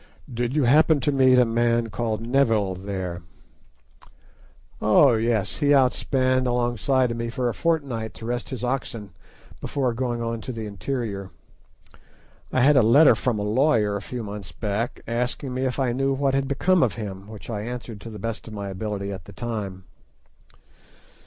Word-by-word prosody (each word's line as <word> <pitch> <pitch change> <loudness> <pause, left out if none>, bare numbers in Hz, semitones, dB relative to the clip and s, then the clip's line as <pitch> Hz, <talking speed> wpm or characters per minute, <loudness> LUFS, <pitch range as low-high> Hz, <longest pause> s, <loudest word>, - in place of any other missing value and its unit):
"Did 120 +3 -2
you 150 - +3
happen 150 +4 +5
to 145 - +1
meet 130 -2 +5
a 125 - +6
man 115 0 +1
called 110 +1 -2
Neville 115 -6 +2
there?" 90 -2 -5 1.6
"Oh, - - +5
yes; 110 -2 0
he 145 -1 +4
outspanned 130 0 +2
alongside 120 +1 +1
of 115 - -4
me 115 0 -3
for 125 0 -1
a - - -3
fortnight 140 -10 -1
to 115 - -9
rest 120 +1 -3
his 130 -2 -5
oxen 120 -5 -3 0.5
before 130 -4 -1
going 120 0 -2
on 115 -1 -3
to 130 - -5
the 115 -2 -5
interior. 100 -1 -4 1.2
I 130 - +2
had 145 +2 +5
a - - +7
letter 135 +8 +7
from 125 -4 -1
a 105 - -2
lawyer 110 -2 +2
a 100 - -3
few 120 +3 -6
months 100 -5 -7
back, 105 +8 -3
asking 125 +3 -2
me 130 +1 -1
if 130 - -2
I 130 -3 +1
knew 135 +2 +1
what 135 0 0
had 135 0 +1
become 180 +6 +2
of - - +2
him, 100 -3 -7
which 110 -1 -10
I 105 -2 -3
answered 120 -2 -6
to 115 - -8
the 110 - -8
best 115 +3 -5
of 110 - -8
my 100 -1 -5
ability 100 0 -4
at 95 -3 -9
the - - -12
time." 105 -6 -5
120 Hz, 180 wpm, -24 LUFS, 105-130 Hz, 1.6 s, a